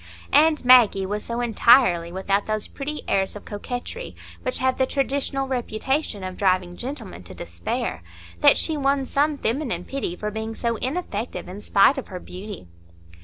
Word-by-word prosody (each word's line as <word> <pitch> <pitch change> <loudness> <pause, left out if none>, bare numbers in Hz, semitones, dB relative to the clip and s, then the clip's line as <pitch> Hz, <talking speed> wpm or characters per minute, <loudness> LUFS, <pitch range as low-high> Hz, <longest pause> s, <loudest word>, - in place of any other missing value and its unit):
And 305 -1 +4
Maggie 235 -6 +6
was 205 +2 -3
so 235 +1 -3
entirely 225 -7 +4
without 195 +2 -1
those 215 -1 -2
pretty 295 +2 -5
airs 195 0 0
of 205 - -9
coquetry 245 - -6 0.3
which 255 - -1
have 260 0 0
the 260 - +3
traditional 275 0 -1
reputation 250 -2 -2
of 185 -1 -6
driving 185 -2 +1
gentlemen 240 - -6
to 85 - -11
despair 85 0 -4 0.4
that - - +6
she 320 - +1
won 275 -1 +1
some 290 +2 +1
feminine 230 - -2
pity 270 -10 -3
for 210 +3 -4
being 220 +1 -4
so 235 -1 -1
ineffective 250 - -3
in 190 +3 -8
spite 210 +8 +4
of - - -8
her 185 -2 -7
beauty. 190 - -9
230 Hz, 165 wpm, -24 LUFS, 195-270 Hz, 0.4 s, Maggie